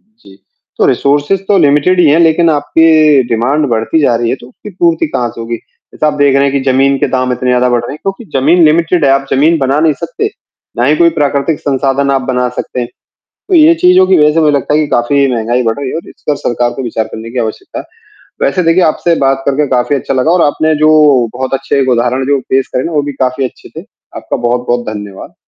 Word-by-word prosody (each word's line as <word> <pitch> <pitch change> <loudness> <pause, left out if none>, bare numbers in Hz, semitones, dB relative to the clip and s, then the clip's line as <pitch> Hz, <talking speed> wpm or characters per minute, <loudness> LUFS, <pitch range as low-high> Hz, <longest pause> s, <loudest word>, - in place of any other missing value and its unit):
जी। 215 - -21 0.4
तो - - +3
रिसोर्सेस 145 +7 0
तो 205 - +3
लिमिटेड 150 +6 +2
ही 170 - +4
हैं, 150 +3 +3
लेकिन 165 0 +3
आपकी 155 -1 +3
डिमांड 130 +6 0
बढ़ती 115 +7 0
जा 125 -5 +2
रही 115 0 -1
है, - - -1
तो 120 - -15
उसकी 210 - -12
पूर्ति 170 -4 0
कहाँ 125 -5 -2
से - - -11
होगी? 115 +1 -4
जैसा 135 - -7
आप 150 - 0
देख 140 -1 +3
रहे 140 - +2
हैं - - -4
कि 140 - 0
ज़मीन 135 +1 +2
के - - 0
दाम 130 -1 -1
इतने 125 0 -2
ज़्यादा 125 0 +2
बढ़ 120 -1 +1
रहे 120 - -6
हैं, 150 - -9
क्योंकि 195 +4 -5
ज़मीन 165 +7 +3
लिमिटेड 165 +1 +2
है, 135 - +3
आप 135 0 +1
ज़मीन 155 +5 +2
बना 135 +1 0
नहीं 160 -1 +3
सकते। - - -3 0.5
ना 120 - 0
ही 150 +4 +2
कोई 170 +1 +3
प्राकृतिक 145 +1 -1
संसाधन 140 0 -1
आप 135 -1 0
बना 125 -1 0
सकते 125 +1 -5
हैं। 120 - -4 0.6
तो - - 0
ये 320 0 +6
चीज़ों 180 - +4
की 190 -1 +3
वज़ह 150 -1 +3
से 165 - +1
मुझे 150 -1 +3
लगता 140 - -3
है 150 - +3
कि 155 - -1
काफ़ी 140 +3 +1
महँगाई 120 +2 -1
बढ़ 115 -1 -1
रही 140 -2 -4
है - - -5
और 165 - -7
इसका 150 - -4
सरकार 120 0 0
को 135 - -6
विचार 115 -2 -3
करने 110 +1 -9
की 125 - -3
आवश्यकता 110 -2 -5
है। - - -9 0.6
वैसे 180 +7 0
देखिए, 165 +2 +2
आपसे 165 +1 +1
बात 135 0 0
करके 140 +1 0
काफ़ी 130 +2 0
अच्छा 135 - -3
लगा 130 +5 +1
और 180 0 +2
आपने 155 +2 +1
जो 155 0 +4 0.4
बहुत 130 +1 -4
अच्छे 135 +1 -1
एक 130 - 0
उदाहरण 125 +2 0
जो 140 -1 +1
पेश 135 0 +1
करे 125 - -3
ना 170 - -4
वो 150 -2 +1
भी 145 0 -5
काफ़ी 130 0 -1
अच्छे 125 - -10
थे। - - -13 0.3
आपका - - -4
बहुत-बहुत 120 0 -1
धन्यवाद। 105 -2 -9
140 Hz, 245 wpm, -11 LUFS, 125-155 Hz, 0.6 s, ये